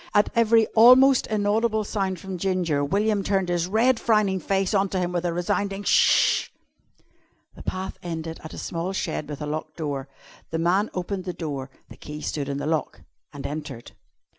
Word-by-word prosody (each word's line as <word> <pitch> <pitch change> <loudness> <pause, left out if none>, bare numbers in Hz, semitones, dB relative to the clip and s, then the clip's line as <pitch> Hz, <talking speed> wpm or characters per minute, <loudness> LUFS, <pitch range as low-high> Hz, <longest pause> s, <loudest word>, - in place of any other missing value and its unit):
At 205 - +4
every 230 -1 +4
almost 255 +3 +6
inaudible 215 +1 +1
sound 195 -3 -2
from 190 -1 -6
Ginger, 175 -6 0
William 200 +6 +1
turned 195 -2 0
his 175 -1 0
red, 225 +5 +2
frowning 210 -4 +2
face 195 +1 0
on 195 -1 +2
to 190 - -2
him 175 -1 -1
with 175 0 -2
a 175 - +1
resounding 195 +3 -2
"Sh!" - - +4 1.1
The - - -11
path 185 0 -5
ended 165 -1 -5
at 160 - -8
a - - -9
small 175 +3 -3
shed 160 -5 -3
with 150 0 -5
a - - -3
locked 155 +1 -5
door. 145 -4 -3 0.4
The 160 - -2
man 180 +6 +1
opened 185 +1 -3
the 180 - -3
door 145 -6 -5 0.2
the - - -13
key 150 0 -8
stood 140 -2 -3
in 140 - -2
the 145 - -4
lock 155 0 -2 0.3
and 145 -2 -9
entered. 145 -5 -6
185 Hz, 185 wpm, -24 LUFS, 160-205 Hz, 1.1 s, almost